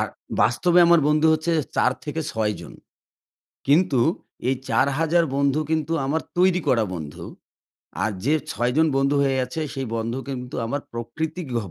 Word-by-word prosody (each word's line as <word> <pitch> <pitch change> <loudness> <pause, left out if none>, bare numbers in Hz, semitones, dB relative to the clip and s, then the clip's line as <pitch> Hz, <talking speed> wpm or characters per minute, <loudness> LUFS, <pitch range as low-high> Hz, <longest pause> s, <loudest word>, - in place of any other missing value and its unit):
আর - - 0 0.3
বাস্তবে 175 +9 +3
আমার 170 -1 +6
বন্ধু 155 +1 +3
হচ্ছে 160 +2 0 0.2
৪ - - +4
থেকে 155 +2 -3
৬ 110 -1 0
জন। - - -10 0.9
কিন্তু 145 -2 +3 0.5
এই 135 - +3
৪ 165 +4 +2
বন্ধু 140 +2 +2
কিন্তু 160 0 0
আমার 155 +4 0 0.2
তৈরি 180 0 +3
করা 115 -3 +3
বন্ধু। 75 -4 -7 0.8
আর 110 - 0
যে, 145 - +3 0.2
৬ 120 +3 0
জন 160 - +5
বন্ধু 135 +1 +2
হয়ে 135 -1 +1
আছে 145 +6 -5
সেই 135 -2 -4
বন্ধু 115 +3 -2
কিন্তু 125 -2 -5
আমার 140 +5 -2
প্রকৃতিক 155 +8 -4
গ - - +2
140 Hz, 160 wpm, -23 LUFS, 125-160 Hz, 0.9 s, আমার